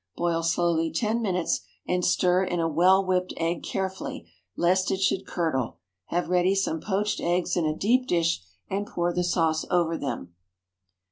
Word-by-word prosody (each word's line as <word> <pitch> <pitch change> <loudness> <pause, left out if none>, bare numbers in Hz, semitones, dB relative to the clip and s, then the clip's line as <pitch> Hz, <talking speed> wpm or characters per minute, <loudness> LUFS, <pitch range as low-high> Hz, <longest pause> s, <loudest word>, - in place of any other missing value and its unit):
Boil 170 -1 0
slowly 165 -1 +1
ten 220 +7 0
minutes, 180 -5 0 0.3
and 180 0 0
stir 180 +1 +3
in 175 -2 -1
a 165 - +1
well 185 +5 +4
whipped 185 0 0
egg 165 +1 -1
carefully, 190 -1 -4 0.3
lest 185 +1 +2
it 190 - 0
should 190 0 0
curdle. 155 -9 -1 0.3
Have 175 +1 -1
ready 180 +2 +2
some 165 -5 0
poached 210 +1 -1
eggs 175 +1 0
in 165 -3 +1
a 155 0 -1
deep 250 +5 +2
dish, 165 - +1 0.3
and 200 +2 -2
pour 175 0 -1
the 180 - 0
sauce 165 -3 +1
over 170 -2 +1
them. 90 -11 -4
175 Hz, 165 wpm, -26 LUFS, 165-190 Hz, 0.3 s, well